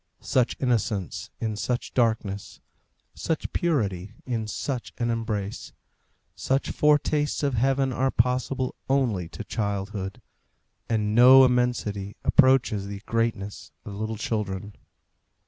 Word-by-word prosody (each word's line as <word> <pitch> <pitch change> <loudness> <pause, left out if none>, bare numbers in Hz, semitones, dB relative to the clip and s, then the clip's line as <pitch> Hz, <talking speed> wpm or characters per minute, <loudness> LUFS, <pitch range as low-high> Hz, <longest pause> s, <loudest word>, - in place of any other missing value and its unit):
Such 125 -2 +1
innocence 110 -7 -1
in 110 -2 -2
such 120 +3 -3
darkness, 110 -5 -1 0.5
such 160 - -3
purity 105 - -1
in 115 -4 -2
such 125 +3 -4
an 120 -1 0
embrace; 110 -3 -3 0.6
such 135 +1 -1
foretastes 150 0 +2
of 140 -2 +1
heaven 135 +2 +1
are 130 +2 +1
possible 130 +1 0 0.2
only 115 -11 +1
to - - -7
childhood, 100 -2 -3 0.7
and 105 -2 0
no 130 +3 +9
immensity 120 -5 0
approaches 130 -7 +3
the 100 0 -7
greatness 115 -3 -2
of 105 - -7
little 110 +2 -4
children. 105 -2 -3
115 Hz, 110 wpm, -26 LUFS, 105-130 Hz, 0.7 s, no